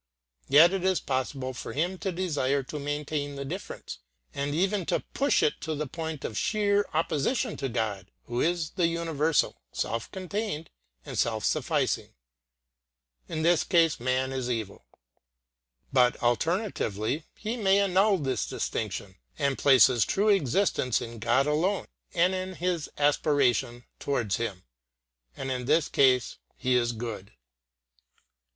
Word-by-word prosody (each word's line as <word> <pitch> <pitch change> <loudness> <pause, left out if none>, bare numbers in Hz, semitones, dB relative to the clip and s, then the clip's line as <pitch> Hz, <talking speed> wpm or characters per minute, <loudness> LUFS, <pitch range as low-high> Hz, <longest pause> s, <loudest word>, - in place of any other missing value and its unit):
Yet 165 +6 +7
it 190 -2 -1
is 190 -1 +2
possible 130 0 -2
for 130 - -7
him 175 +5 -1
to 190 - -2
desire 145 -7 0
to 150 +3 -6
maintain 145 0 -3
the 140 0 -5
difference 180 +8 -7 0.3
and 145 +1 -2
even 195 +3 +1
to - - +1
push 280 +1 +2
it 150 - +1
to 160 -1 -3
the 150 +1 -2
point 160 +1 -5
of 110 - -4
sheer 205 -1 +1
opposition 160 - 0
to 135 -1 -2
God, 105 -5 -2
who 120 +1 -3
is 170 -2 0
the 175 -2 +1
universal, 165 -2 0
self 115 0 -3
contained 190 -3 -4 0.3
and - - -4
self - - 0
sufficing. - - 0 1.1
In 155 - -3
this 170 -1 +4
case 165 -4 +3
man 130 +2 0
is 130 -2 -3
evil. 110 -5 -4 1.1
But, 125 -2 +4
alternatively, 145 - 0
he 220 +2 -4
may 200 -4 +3
annul 195 +1 +3
this 135 -5 -1
distinction 100 -3 -4 0.2
and 140 -2 +1
place 130 -5 +6
his 120 -4 +3
true 205 +2 +1
existence 180 - +2
in 115 -1 -7
God 120 +5 +2
alone 165 +7 +1 0.3
and 180 +2 +3
in 185 0 -4
his 175 -2 -2
aspiration 140 -5 +2 0.2
towards 120 -8 -1
Him; 100 -6 -4 0.7
and 135 0 -3
in 125 -1 -3
this 150 +3 +3
case 130 -3 +3 0.2
he 130 - 0
is 120 -1 +2
good. 110 -4 -6
145 Hz, 145 wpm, -28 LUFS, 125-175 Hz, 1.1 s, Yet